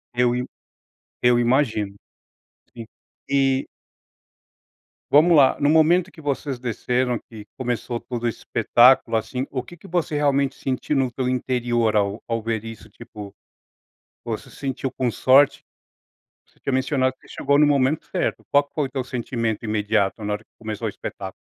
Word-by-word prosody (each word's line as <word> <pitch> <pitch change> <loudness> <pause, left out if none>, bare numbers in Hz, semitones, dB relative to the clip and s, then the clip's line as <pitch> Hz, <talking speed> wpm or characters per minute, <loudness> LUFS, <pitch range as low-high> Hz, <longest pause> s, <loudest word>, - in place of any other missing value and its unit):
Eu 120 0 +2
im 125 0 -2 0.8
eu 125 0 +4
imagino, 120 -5 +1 0.8
sim, 115 -1 -8 0.4
e 135 -1 +2 1.5
Vamos 165 +4 +6
lá, 135 -2 +5
no 145 - +3
momento 165 +4 +4
que 160 - -14
vocês 140 -2 -3
desceram 125 0 -1
que 110 -1 -12
começou 120 -1 -3
todo 120 0 -6
o - - +2
espetáculo, 120 +2 +3
assim, 125 +4 -2
o 130 - -2
que 175 +8 -13
que 185 - -14
você 170 -4 -1
realmente 140 -2 +1
sentiu 135 +3 -2
no 135 -2 +1
teu 125 +1 -2
interior 120 -3 0
ao 100 +1 0
ao 115 0 -1
ver 110 -1 -2
isso 115 -1 -9
tipo, 105 -2 -11 0.9
você - - -5
se - - -16
sentiu 135 -1 -3
com 130 -1 -1
sorte? 130 +4 +4 0.8
Você - - -31
tinha 135 - -3
mencionado 130 0 +1
que - - -23
você - - -12
chegou 140 0 +2
no 150 - +6
momento 140 +1 +2
certo, - - -2
qual 145 0 +5
que 140 - -27
foi 150 - 0
o - - -6
teu 130 -1 -2
sentimento 120 -3 -3
imediato 105 -1 0
na 105 0 -1
hora 105 +1 -5
que - - -50
começou 110 0 -4
o - - -1
espetáculo? 95 -2 -7
125 Hz, 170 wpm, -23 LUFS, 115-140 Hz, 1.5 s, Vamos